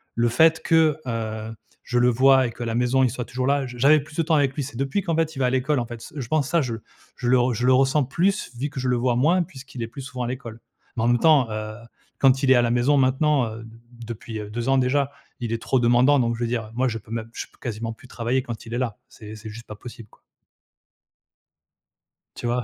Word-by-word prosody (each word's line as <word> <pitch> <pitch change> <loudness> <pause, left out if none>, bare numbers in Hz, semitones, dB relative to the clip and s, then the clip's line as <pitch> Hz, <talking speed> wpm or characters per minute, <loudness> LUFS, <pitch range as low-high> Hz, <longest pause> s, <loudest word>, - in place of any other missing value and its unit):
le 120 0 +2
fait 160 +7 +4
que, 160 -2 +3
heu, 110 -1 -4 0.3
je 120 0 0
le 125 - +4
voie 130 +1 +5
et - - -6
qu'à 120 - -6
la 115 -1 -2
maison, 125 +2 +2
il 130 - +3
soit 125 -1 -5
toujours 125 +1 -3
là, 140 -1 +2
j 125 - -9
j'avais 150 +4 +6
plus 150 +1 -14
de - - +3
temps 160 +1 +2
avec 140 -3 +2
lui. 145 - -2
C'est 130 -3 -8
depuis 135 +9 -1
qu'en 170 -4 -1
fait, 160 -1 0
il - - -6
va 130 - +2
à - - +2
l'école, 130 +2 +1
en 120 - -2
fait. 120 -1 -8
C - - -12
je 130 - -4
pense, 150 0 +1
ça 170 -2 +3
je 120 -4 -3 0.4
je 125 - -3
le 130 0 +5
re 125 +1 +2
je 120 +2 -2
le 130 - +6
ressens 135 +3 +3
plus, 180 - 0
vu 145 +3 -2
que 145 -2 -6
je 130 - -2
le 125 - +2
vois 120 0 +1
moins, 170 +8 +3
puisqu'il 130 -5 -9
est 115 - -4
plus 135 +4 -9
souvent 130 -2 -5
à - - -2
l'école. 120 -3 -6 0.4
Mais 110 - 0
en - - +2
même 120 0 +3
temps, 150 -3 +5
heu, 110 0 -4 0.5
quand 135 -1 +4
il 130 - +4
est 130 - +8
à 120 - +5
la 120 - +1
maison 120 +4 +3
maintenant, 135 +1 +2
heu, 110 +1 -8
d 115 - -12
d 115 - -16 0.3
depuis 115 -1 -6
heu 105 -1 -7
2 120 +3 -3
ans 135 - +4
déjà, 140 +2 +1 0.3
il 115 -2 -3
est 115 - -3
trop 130 - +1
demandant. 125 +4 +4
Donc 120 -1 +1
je - - -8
veux 120 - 0
dire, 115 -1 -2
heu, - - -13
moi 130 +2 +1
je 115 - -2
peux 110 - -17
même 115 -1 -4
je - - -6
peux - - -26
quasiment 115 0 -4
plus 125 - -17
travailler 125 +2 -1
quand 115 -4 -7
il 115 - -8
est - - -1
là, 115 -5 -2
c'est 110 -1 -11
c'est 110 0 -9
juste 115 +3 -10
pas 105 - -8
possible, 115 0 -11
quoi. - - -24 2.2
Tu - - -6
vois? 120 +1 0
125 Hz, 280 wpm, -23 LUFS, 115-135 Hz, 2.2 s, est